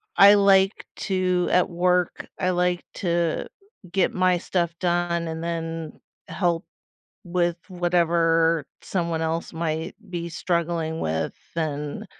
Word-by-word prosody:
I 200 +3 +9
like 195 0 +4 0.2
to, 185 -2 +1
at 180 - +3
work, 180 0 +1
I 185 - +1
like 180 0 +1
to 170 -3 0 0.4
get 190 -1 +2
my 185 -1 +3
stuff 170 -1 -1
done 175 -1 0
and 160 0 -4
then 165 -1 -4 0.3
help 175 -2 0 0.6
with 175 -1 0
whatever 165 -3 +2 0.2
someone 170 -3 -2
else 165 +1 -2
might 160 0 -3
be 170 -1 -4
struggling 165 -1 -1
with, 80 +1 -1 0.2
and 150 -3 -3
170 Hz, 120 wpm, -24 LUFS, 165-180 Hz, 0.6 s, I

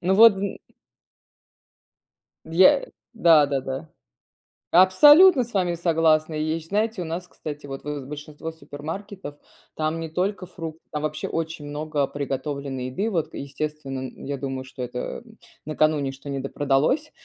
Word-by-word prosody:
Ну 185 +2 +2
вот, 220 0 +8
м. 200 +1 -4 1.9
Я 185 - +5 0.3
да, 165 -9 +6
да, 140 -1 -1
да. 135 +4 -5 0.8
Абсолютно 285 - +7
с 235 - -12
вами 180 -3 +1
согласна! 165 -2 +2
И 155 - -1
ещ 160 +1 -2
знаете 215 +1 0
у 175 - -3
нас, 170 +3 -5
кстати, 150 -4 -8
вот 135 -1 -7
в 145 -2 -5
большинство 150 +2 -7
супермаркетов, 160 +3 -8 0.4
там 155 +1 -1
не 165 - -5
только 185 +3 -2
фрукты, 165 -3 -8
там 150 0 -3
вообще 155 0 -3
очень 160 -2 -4
много 145 -1 -1
приготовленной 140 -1 -4
еды. 195 - -2
Вот 170 -7 -1
к - - -32
естественно, 140 -1 -5
н - - -12
я 140 0 -3
думаю, 135 -1 -4
что 130 0 -7
это 125 0 -5 0.4
накануне, 155 -2 +1
что 135 +1 -10
недопродалось, 140 - 0
155 Hz, 145 wpm, -24 LUFS, 140-180 Hz, 1.9 s, вот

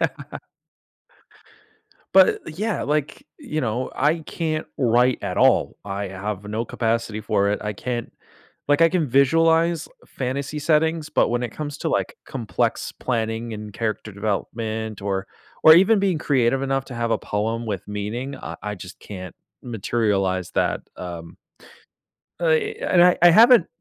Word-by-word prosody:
Yeah. - - -3 1.8
But, 190 -1 +8 0.2
eh, - - -5
yeah, 215 0 -1
like, 150 -1 -1 0.2
y 295 - -14
you 155 - 0
know, 120 0 -2
I 150 +4 +2
can't 155 0 -3
write 125 0 +3
at - - -3
all, - - +3
I 100 0 -4
have 95 +1 -5
no 105 +3 -3
capacity 115 -2 -2
for 100 -1 +1
it, 105 - -1
I 105 - -2
can't 120 +3 -4 0.6
like, 145 +3 +4
I 165 - +6
can 165 -3 0
visualize 165 +5 +3 0.2
fantasy 140 +3 -4
settings, 160 +1 +1
but - - +2
when 120 0 0
it 120 -2 -3
comes 145 +1 -5
to, - - -2
like, - - -1
complex - - -2
planning 115 -1 -3
and 105 -1 -8
character 110 -1 -3
development 110 +2 -3
or 100 -1 -2 0.4
or 160 - +10
even 195 +4 +5
being 190 -5 +1
creative 135 -2 +1
enough 135 0 -1
to 125 - -9
have 115 0 -1
a 110 - +2
poem 115 +3 -2
with 100 -3 -4
meaning, 110 +7 -4
I - - -7
I 105 0 -3
just 90 0 -11
can't 95 -3 -9 0.3
materialize 100 -5 -1
that. - - 0 0.2
Um, 85 -2 -8 1.0
uh, 170 - 0
eh, 160 0 +2
and 175 - +5
I 180 0 +6
I 175 - +9
haven't 230 0 +7
120 Hz, 160 wpm, -23 LUFS, 105-155 Hz, 1.8 s, or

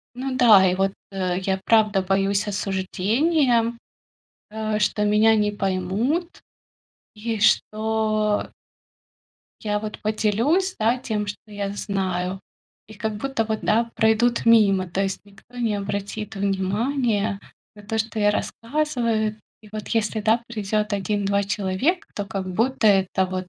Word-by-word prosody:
Ну 260 +1 -3
да, 215 -7 +7
и - - 0
вот, 195 +1 +1 0.2
э, 185 -2 -1
я, 190 0 -1
правда, 215 -3 +3
боюсь 195 +2 +1
осуждения, 230 - +1 0.8
э, 215 0 -2
что 210 0 +1
меня 215 +2 +4
не 210 -1 +1
поймут 205 - -1 0.7
и 225 +1 -3
что 215 0 +1 1.1
Я 210 -1 -1
вот 215 0 -6
поделюсь, 230 - +1
да, 230 +3 +2
тем, 215 -4 -3
что 205 +1 -8
я 200 -1 -3
знаю. 190 -2 -2 0.5
И 220 - -12
как 220 0 -3
будто 270 0 -1
вот, 220 0 -2
да, 230 +2 +1
пройдут 230 +2 +2
мимо. 200 -5 +5
То 190 +3 -1
есть 195 -1 -2
никто 205 +4 -19
не 230 -3 0
обратит 205 +1 -4
внимания 205 +2 0 0.3
на 210 - -14
то, 220 +2 -3
что 220 0 -2
я 205 0 +4
рассказываю. 230 -2 -1 0.3
И 210 - -15
вот 215 -1 -6
если, 220 -1 0
да, 225 +2 +2
придёт 215 -1 -2
1-2 200 0 0
человека, 200 - -1
то 205 - -3
как 195 -2 -5
будто 225 +5 +1
это 190 -2 +3
вот 185 0 -5
210 Hz, 140 wpm, -23 LUFS, 195-225 Hz, 1.1 s, да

